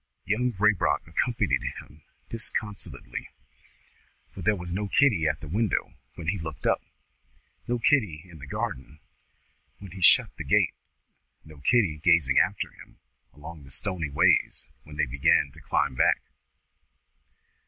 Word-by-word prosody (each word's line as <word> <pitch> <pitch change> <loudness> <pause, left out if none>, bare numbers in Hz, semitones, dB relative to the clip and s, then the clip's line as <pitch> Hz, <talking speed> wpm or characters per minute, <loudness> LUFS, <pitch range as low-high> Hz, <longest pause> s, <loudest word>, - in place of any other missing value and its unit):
Young 125 +4 0
Raybrock 95 -7 +2
accompanied 115 +9 0
him 75 - -8 0.3
disconsolately; 105 - -4 1.0
for - - -10
there 105 0 +2
was 90 -2 -7
no 100 +3 -2
Kitty 100 - +3
at 75 0 -1
the 75 - -8
window 105 +5 -1 0.2
when 80 -2 -4
he 100 +2 -1
looked 80 -3 -7
up, - - +2 0.9
no 120 0 0
Kitty 105 - +1
in 85 -3 -14
the 70 - -10
garden 70 +1 -5 0.8
when 100 -3 -11
he 95 +1 -9
shut 85 - +6
the - - -5
gate, - - +2 0.7
no 75 -2 -14
Kitty 85 - +2
gazing 85 -6 +4
after - - 0
them - - -15 0.3
along 75 +2 -11
the 70 - -14
stony 85 0 -1
ways 70 - +3 0.2
when 75 - -11
they - - +1
begin 70 - +2
to - - -14
climb - - 0
back. - - +3
85 Hz, 145 wpm, -27 LUFS, 75-105 Hz, 1.0 s, shut